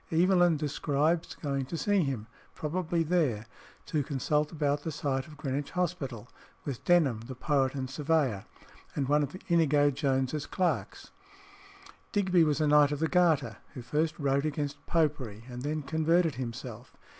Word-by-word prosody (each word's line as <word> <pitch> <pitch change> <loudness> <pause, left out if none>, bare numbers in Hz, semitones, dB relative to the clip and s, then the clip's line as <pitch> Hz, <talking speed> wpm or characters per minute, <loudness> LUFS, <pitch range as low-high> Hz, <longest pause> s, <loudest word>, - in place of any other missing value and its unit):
Evelyn 175 0 +4
describes 150 +2 0
going 140 -2 -2
to 165 +6 -5
see 200 +5 +2
him 135 -8 -2 0.3
(probably 170 +2 -1
there), 150 -10 +1 0.4
to 155 - 0
consult 150 +2 0
about 145 -3 0
the 160 - -4
site 135 -3 -2
of 150 -1 -13
Greenwich 140 +1 -3
Hospital, 135 -10 -2 0.4
with 135 -5 -5
Denham 155 -10 +4
the 130 - -6
poet 135 0 +1
and 130 -1 -3
surveyor, 140 -6 0 0.5
and 135 -2 -1
one 150 +2 +3
of 145 +5 -3
Inigo 150 -4 +4
Jones's 135 +1 -1
clerks. 185 -2 -2 1.0
Digby 185 -4 +3
was 150 -1 +1
a 155 - +2
Knight 150 -1 +5
of 145 - -1
the 160 +3 +1
Garter, 160 - +2 0.2
who 125 - -6
first 155 +6 0
wrote 140 -2 +1
against 145 -2 -3
Popery 135 -10 0
and 125 -1 -7
then 150 +2 -2
converted 160 +3 +2
himself. 125 -1 -7
145 Hz, 155 wpm, -29 LUFS, 135-160 Hz, 1.0 s, Knight